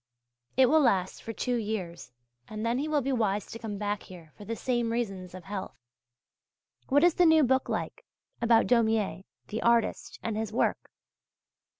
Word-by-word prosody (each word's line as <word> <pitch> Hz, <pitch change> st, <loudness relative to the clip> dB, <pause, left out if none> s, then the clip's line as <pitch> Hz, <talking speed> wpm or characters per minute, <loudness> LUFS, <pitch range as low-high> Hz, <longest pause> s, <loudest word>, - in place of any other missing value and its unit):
It 265 Hz, -, +7 dB
will 315 Hz, +5 st, +4 dB
last 195 Hz, -10 st, +1 dB
for 225 Hz, -, -6 dB
two 245 Hz, +2 st, -1 dB
years, 190 Hz, -, -4 dB, 0.4 s
and 215 Hz, +1 st, -5 dB
then 235 Hz, +2 st, +1 dB
he 295 Hz, -, -2 dB
will 300 Hz, -2 st, +1 dB
be 275 Hz, -, -1 dB
wise 210 Hz, -5 st, 0 dB
to 230 Hz, -, -9 dB
come 215 Hz, -3 st, -5 dB
back 205 Hz, 0 st, -2 dB
here 170 Hz, -4 st, -13 dB
for 205 Hz, -, -11 dB
the 230 Hz, -, -3 dB
same 240 Hz, 0 st, -1 dB
reasons 195 Hz, -6 st, -3 dB
of 185 Hz, -, -9 dB
health. 195 Hz, -1 st, -6 dB, 1.1 s
What 285 Hz, +3 st, +4 dB
is 350 Hz, -1 st, +6 dB
the 355 Hz, -, +4 dB
new 320 Hz, -1 st, +6 dB
book 260 Hz, 0 st, +1 dB
like, -, -, -3 dB, 0.4 s
about 230 Hz, -1 st, +4 dB
Daumier, 220 Hz, -5 st, +1 dB, 0.3 s
the 220 Hz, -, -3 dB
Artist 235 Hz, -1 st, +1 dB
and 225 Hz, -, -2 dB
his 220 Hz, -1 st, -3 dB
Work? 230 Hz, -, 0 dB
225 Hz, 180 wpm, -28 LUFS, 205-245 Hz, 1.1 s, It